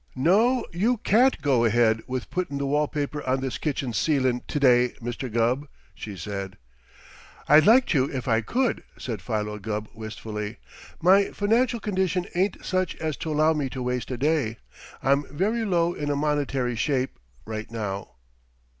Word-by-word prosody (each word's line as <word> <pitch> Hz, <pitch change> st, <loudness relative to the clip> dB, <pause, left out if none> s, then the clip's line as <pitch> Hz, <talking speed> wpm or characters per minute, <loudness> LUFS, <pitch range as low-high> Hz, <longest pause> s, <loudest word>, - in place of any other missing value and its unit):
"No, 215 Hz, -, +3 dB
you 225 Hz, +8 st, +1 dB
can't 240 Hz, +6 st, +3 dB
go 130 Hz, -5 st, +3 dB
ahead 115 Hz, -1 st, +3 dB
with 130 Hz, -1 st, -4 dB
puttin' 175 Hz, -6 st, -2 dB
the 140 Hz, -, -2 dB
wall 150 Hz, +2 st, +1 dB
paper 145 Hz, 0 st, -3 dB
on 130 Hz, +1 st, +2 dB
this 130 Hz, -2 st, -3 dB
kitchen 135 Hz, -5 st, -2 dB
ceilin' 130 Hz, -3 st, +1 dB
to 145 Hz, -, -2 dB
day, 125 Hz, -2 st, +4 dB
Mr. 120 Hz, +1 st, -5 dB
Gubb," 120 Hz, +5 st, +1 dB, 0.3 s
she 100 Hz, 0 st, -8 dB
said. 95 Hz, +2 st, -5 dB, 0.9 s
"I'd 155 Hz, +5 st, +6 dB
like 245 Hz, +3 st, +7 dB
to, 135 Hz, -2 st, +2 dB
if 130 Hz, -1 st, -4 dB
I 115 Hz, -1 st, +3 dB
could," 245 Hz, -, 0 dB, 0.2 s
said 115 Hz, -6 st, -5 dB
Philo 105 Hz, 0 st, -3 dB
Gubb 105 Hz, +1 st, -4 dB
wistfully. 110 Hz, -1 st, -6 dB, 0.5 s
"My 195 Hz, +3 st, +6 dB
financial 230 Hz, +5 st, +1 dB
condition 190 Hz, -3 st, 0 dB
ain't 190 Hz, +2 st, -1 dB
such 185 Hz, -2 st, 0 dB
as 155 Hz, -2 st, -3 dB
to 160 Hz, -, -4 dB
allow 155 Hz, +1 st, +3 dB
me 145 Hz, -4 st, -2 dB
to 130 Hz, 0 st, -5 dB
waste 125 Hz, 0 st, -2 dB
a 130 Hz, -, -3 dB
day. 140 Hz, -5 st, 0 dB, 0.5 s
I'm 140 Hz, +2 st, +3 dB
very 210 Hz, +10 st, 0 dB
low 175 Hz, -4 st, +1 dB
in 145 Hz, -3 st, -4 dB
a 145 Hz, -, +1 dB
monetary 140 Hz, -4 st, 0 dB
shape, 130 Hz, +3 st, -1 dB, 0.3 s
right 110 Hz, 0 st, -5 dB
now." 105 Hz, -4 st, -5 dB
140 Hz, 165 wpm, -25 LUFS, 115-170 Hz, 0.9 s, like